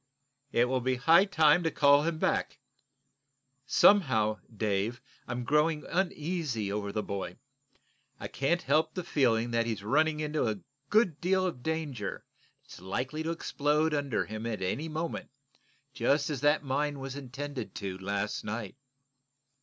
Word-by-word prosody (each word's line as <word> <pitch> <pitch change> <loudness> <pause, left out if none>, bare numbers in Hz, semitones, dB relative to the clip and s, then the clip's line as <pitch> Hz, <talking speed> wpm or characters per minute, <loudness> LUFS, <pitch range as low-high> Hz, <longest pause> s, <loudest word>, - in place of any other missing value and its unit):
"It 120 - +3
will 130 0 0
be 130 +1 +1
high 165 +9 +5
time 160 -4 +4
to 165 - +1
call 145 -2 +5
him 160 +1 -1
back. - - 0 1.1
Somehow, 110 - +4
Dave, 110 +2 -1 0.3
I'm 120 0 -3
growing 150 +4 +2
uneasy 160 - -1
over 100 -1 -3
the 105 +1 -2
boy. 100 -1 -5 0.8
I - - -5
can't 170 +6 0
help 155 +3 +2
the 180 - -3
feeling 120 -6 +1
that 115 0 +1
he's 110 -3 -3
running 155 +7 +2
into 150 -4 0
a 110 -2 -1 0.3
good 210 -8 +2
deal 185 +1 +2
of 165 -9 -3
danger 150 -8 -3 0.4
that's - - -13
likely 125 +11 -3
to 160 - -2
explode 155 -1 0
under 140 -4 0
him 110 +2 -5
at 110 -4 -3
any 145 - -2
moment, 160 +2 -4 0.6
just 145 +3 +1
as 135 -4 -3
that 145 +1 +3
mine 145 +2 -1
was 135 0 -6
intended 135 -4 -6
to 95 -2 -4
last 100 +2 -2
night." 110 0 -5
140 Hz, 150 wpm, -30 LUFS, 115-155 Hz, 1.1 s, high